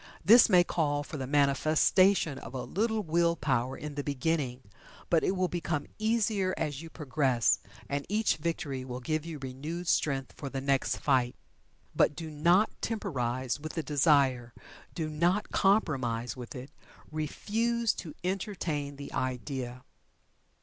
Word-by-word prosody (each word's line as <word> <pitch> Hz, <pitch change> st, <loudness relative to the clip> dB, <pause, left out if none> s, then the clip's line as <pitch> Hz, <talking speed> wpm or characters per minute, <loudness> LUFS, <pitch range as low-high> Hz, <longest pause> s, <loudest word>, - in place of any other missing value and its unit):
This 230 Hz, +4 st, +8 dB
may 180 Hz, -1 st, +6 dB
call 145 Hz, -4 st, 0 dB
for 150 Hz, -, -7 dB
the 130 Hz, -2 st, -4 dB
manifestation 150 Hz, +4 st, +3 dB
of 120 Hz, +3 st, -9 dB
a 130 Hz, -, -3 dB
little 220 Hz, +2 st, -1 dB
will 170 Hz, 0 st, +2 dB
power 130 Hz, -4 st, -1 dB
in 150 Hz, -1 st, -6 dB
the 145 Hz, 0 st, -3 dB
beginning, 140 Hz, -2 st, -1 dB, 0.5 s
but 165 Hz, -2 st, +4 dB
it 190 Hz, -, +1 dB
will 185 Hz, 0 st, +1 dB
become 170 Hz, -4 st, -2 dB
easier 215 Hz, -4 st, +1 dB
as 150 Hz, -3 st, -2 dB
you 165 Hz, -, -9 dB
progress, 135 Hz, -6 st, +1 dB, 0.3 s
and 140 Hz, 0 st, -2 dB
each 215 Hz, +2 st, +1 dB
victory 150 Hz, -5 st, -3 dB
will 125 Hz, -1 st, -6 dB
give 155 Hz, +5 st, -2 dB
you 165 Hz, -2 st, -5 dB
renewed 145 Hz, +6 st, -6 dB
strength 135 Hz, -5 st, 0 dB
for 140 Hz, -, -6 dB
the 135 Hz, -, -4 dB
next 135 Hz, 0 st, +1 dB
fight. 130 Hz, -3 st, +1 dB, 0.6 s
But 150 Hz, -, +3 dB
do 160 Hz, 0 st, -6 dB
not 170 Hz, +8 st, +3 dB
temporize 130 Hz, -, -2 dB
with 155 Hz, +1 st, -6 dB
the 160 Hz, -, -2 dB
desire 135 Hz, -5 st, +2 dB, 0.4 s
do 160 Hz, -3 st, -2 dB
not 170 Hz, +7 st, 0 dB
compromise 130 Hz, -, +1 dB
with 125 Hz, -2 st, -8 dB
it 130 Hz, +2 st, -8 dB, 0.4 s
refuse 225 Hz, +9 st, 0 dB
to 155 Hz, -4 st, -7 dB
entertain 180 Hz, -7 st, -2 dB
the 140 Hz, 0 st, -9 dB
idea. 125 Hz, -1 st, -3 dB
150 Hz, 150 wpm, -30 LUFS, 135-175 Hz, 0.6 s, This